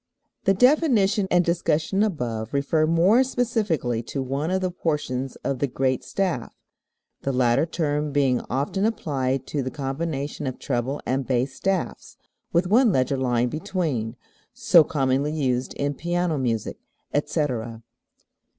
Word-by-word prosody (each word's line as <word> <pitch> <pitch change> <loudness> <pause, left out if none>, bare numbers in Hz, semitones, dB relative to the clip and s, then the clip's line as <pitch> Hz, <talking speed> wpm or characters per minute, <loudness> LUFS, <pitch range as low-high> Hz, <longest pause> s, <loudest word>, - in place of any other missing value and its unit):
The 195 - +4
definition 225 - +3
and 175 -1 +3
discussion 170 +2 +1
above 120 - -2
refer 155 +3 +2
more 180 +10 +4
specifically 215 - 0
to 135 +3 -4
one 140 +5 -2
of 190 +1 0
the 185 -1 -1
portions 140 -6 -2
of 135 -2 -1
the 140 - +1
"great 130 0 0
staff," 180 -12 -2 0.7
the 135 - -1
latter 125 +3 +2
term 150 -3 -1
being 135 -3 +2
often 140 +9 -1
applied 135 - -1
to 145 - -2
the 130 - -3
combination 140 +1 -3
of 130 - -4
treble 130 +1 -2
and 130 0 -1
bass 130 +1 0
staffs 190 +5 -3 0.3
(with 170 +2 +2
one 225 +5 +4
leger 130 -2 +1
line 125 -2 +1
between) 155 - -2 0.4
so 230 -9 +6
commonly 140 0 0
used 130 -4 -1
in 145 0 -1
piano 175 0 -1
music, 115 -4 -2 0.3
etc. 145 -6 0
13. 115 0 -10
145 Hz, 140 wpm, -24 LUFS, 130-180 Hz, 0.7 s, so